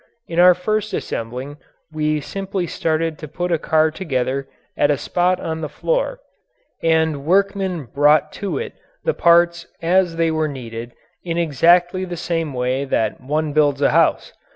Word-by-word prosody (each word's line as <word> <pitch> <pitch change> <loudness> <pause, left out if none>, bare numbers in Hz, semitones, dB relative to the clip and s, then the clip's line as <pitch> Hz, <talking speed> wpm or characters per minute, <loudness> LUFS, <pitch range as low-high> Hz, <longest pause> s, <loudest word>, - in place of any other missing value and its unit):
In 170 0 -2
our 180 0 +7
first 215 +3 -1
assembling 125 +5 -5 0.3
we 155 -1 0
simply 195 +3 -4
started 160 -1 -1
to 155 - -7
put 175 +4 -3
a 165 - +2
car 155 +1 +2
together 135 -5 -2 0.3
at 145 - +2
a 145 - +2
spot 180 +5 0
on 160 0 -4
the 155 - -4
floor - - -1 0.6
and 160 -3 +1
workmen 190 0 +1
brought 150 +4 +3
to 200 - -2
it 460 0 -5 0.3
the 485 - +1
parts 170 0 +3
as 175 0 +2
they 165 -1 +1
were 155 -1 0
needed 120 -4 -7 0.3
in 170 -1 -3
exactly 175 +4 +3
the 175 -2 -5
same 165 -2 -2
way 130 +1 -1
that 110 -5 -1
one 150 +3 -2
builds 145 -2 +2
a - - +4
house. - - +2
160 Hz, 160 wpm, -20 LUFS, 145-180 Hz, 0.6 s, our